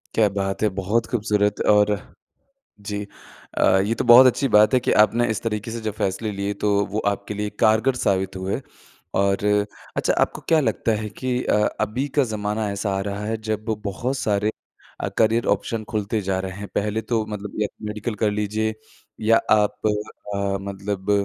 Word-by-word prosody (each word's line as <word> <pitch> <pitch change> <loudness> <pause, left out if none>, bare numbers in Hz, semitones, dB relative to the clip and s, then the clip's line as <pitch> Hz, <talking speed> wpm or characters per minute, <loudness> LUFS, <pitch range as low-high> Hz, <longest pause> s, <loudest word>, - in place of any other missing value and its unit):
क्या 110 -2 +5
बात 95 0 -2
है! - - +5
बहुत 105 +5 +1
खूबसूरत 105 -3 0
और 105 0 +6 0.9
जी। 105 0 -4 0.5
अ, - - +4 0.2
ये 115 +2 0
तो - - -1
बहुत 125 +2 +10
अच्छी 135 +2 +2
बात 105 +4 +6
है 130 - +5
कि - - 0
आपने 115 +3 +3
इस 110 - -1
तरीके 110 0 -3
से 115 0 -5
जो - - 0
फैसले 105 +3 -1
लिए 100 +1 -2
तो 105 - +3 0.2
वो 105 - -1
आपके 100 +1 -5
लिए 105 0 -3
कारगर 110 +4 +4
साबित 95 -4 0
हुए 95 +7 -3 0.6
और 100 +1 +1 0.5
अच्छा - - +2
आपको - - 0
क्या 160 -1 +5
लगता 115 -3 0
है 105 - -4
कि 125 +5 -2
अ, - - +2 0.3
अभी 120 +7 -1
का 140 - +6
ज़माना 105 0 -2
ऐसा 100 0 -2
आ - - -1
रहा 100 +1 -4
है 110 +1 -1
जब 110 0 -2 0.2
बहुत 125 +7 -2
सारे 105 -1 0 0.5
अ, - - -2
करियर 115 +1 +3
ऑप्शन 115 -2 -5
खुलते 105 0 -1
जा 95 0 -1
रहे 95 0 -4
हैं। 100 - -6
पहले 105 +2 0
तो 115 -2 -1
मतलब 105 -1 -6
य 105 - +2 0.2
मेडिकल 105 +1 -4
कर 105 - +2
लीजिए 105 +1 -1 0.5
या 115 +1 +5
आप 105 -1 +4
अ, 100 -2 -2
मतलब 100 0 -3
105 Hz, 185 wpm, -23 LUFS, 100-110 Hz, 0.9 s, बहुत